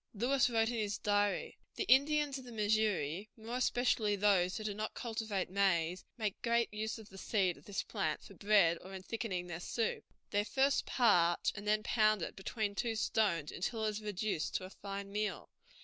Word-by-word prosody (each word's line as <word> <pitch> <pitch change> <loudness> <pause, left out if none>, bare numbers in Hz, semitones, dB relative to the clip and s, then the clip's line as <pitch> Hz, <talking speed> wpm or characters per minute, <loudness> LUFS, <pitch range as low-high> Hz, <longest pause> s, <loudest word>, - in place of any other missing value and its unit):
Lewis 250 +4 +2
wrote 225 -1 +2
in 240 -2 -2
his 210 -1 -1
diary: 205 -1 0 0.2
"The - - -1
Indians 290 -2 +3
of - - -10
the 245 - -10
Missouri, 210 -5 0
more 230 +2 -4
especially 245 -4 +2
those 190 -3 +3
who 215 - -5
do 210 -1 -2
not 215 +2 -4
cultivate 220 -6 -3
maize, 185 -3 +1
make 215 -4 -2
great 235 -2 +1
use 215 +1 -3
of 220 -1 -12
the 195 - -11
seed 190 -5 +1
of - - -18
this 205 - -3
plant - - -2
for - - -12
bread 200 -5 +3
or 190 +1 -9
in 190 - -8
thickening 190 -5 -3
their 175 -2 -6
soup. 225 +5 -2 0.3
They 205 0 +2
first 270 +6 +1
parch 175 -9 +3
and 205 0 -8
then 215 0 +2
pound 215 -4 +3
it - - -5
between 205 +1 -2
two 225 +2 -1
stones 195 -8 +1
until 220 +5 -2
it - - +2
is 215 0 -4
reduced 210 -5 -2
to - - -1
a 185 - -10
fine 200 0 -6
meal. 210 +1 -3
210 Hz, 195 wpm, -34 LUFS, 195-225 Hz, 0.3 s, Indians